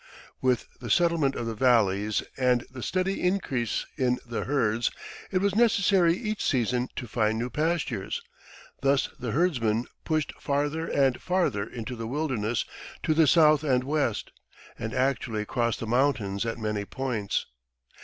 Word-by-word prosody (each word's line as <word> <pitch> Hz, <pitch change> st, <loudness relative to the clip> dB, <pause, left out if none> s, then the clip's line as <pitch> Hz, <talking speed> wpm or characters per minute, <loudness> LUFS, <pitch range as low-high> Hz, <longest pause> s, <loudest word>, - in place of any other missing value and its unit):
With 130 Hz, -2 st, +1 dB
the 120 Hz, -, -7 dB
settlement 165 Hz, 0 st, +3 dB
of 120 Hz, -, -3 dB
the 115 Hz, -, -2 dB
valleys 105 Hz, -4 st, +2 dB
and 125 Hz, -2 st, +2 dB
the 130 Hz, -1 st, -8 dB
steady 185 Hz, +7 st, -1 dB
increase 155 Hz, -, 0 dB
in 125 Hz, -3 st, +2 dB
the 120 Hz, -1 st, -3 dB
herds, 120 Hz, -5 st, +1 dB, 0.4 s
it 185 Hz, -1 st, 0 dB
was 200 Hz, -1 st, +2 dB
necessary 195 Hz, -6 st, +4 dB
each 215 Hz, -1 st, -3 dB
season 125 Hz, -1 st, +1 dB
to -, -, -4 dB
find 110 Hz, 0 st, +1 dB
new 120 Hz, +2 st, -3 dB
pastures. 170 Hz, -, -1 dB, 0.6 s
Thus 135 Hz, 0 st, +2 dB
the 125 Hz, -, -3 dB
herdsmen 120 Hz, -6 st, +1 dB, 0.2 s
pushed 155 Hz, -2 st, -1 dB
farther 145 Hz, +3 st, -1 dB
and 135 Hz, -3 st, +2 dB
farther 170 Hz, -, 0 dB
into 120 Hz, +1 st, -6 dB
the 115 Hz, -1 st, -5 dB
wilderness 125 Hz, -5 st, -1 dB, 0.4 s
to 155 Hz, -, +2 dB
the 160 Hz, -1 st, +4 dB
south 155 Hz, -1 st, +5 dB
and 130 Hz, -4 st, +2 dB
west, 140 Hz, -6 st, -1 dB, 0.5 s
and 110 Hz, -, -3 dB
actually 120 Hz, -5 st, 0 dB
crossed 115 Hz, +1 st, 0 dB
the -, -, -4 dB
mountains 115 Hz, -4 st, +1 dB
at 115 Hz, -, -2 dB
many 105 Hz, -2 st, -2 dB
points. 115 Hz, -3 st, -2 dB
130 Hz, 150 wpm, -27 LUFS, 115-155 Hz, 0.6 s, south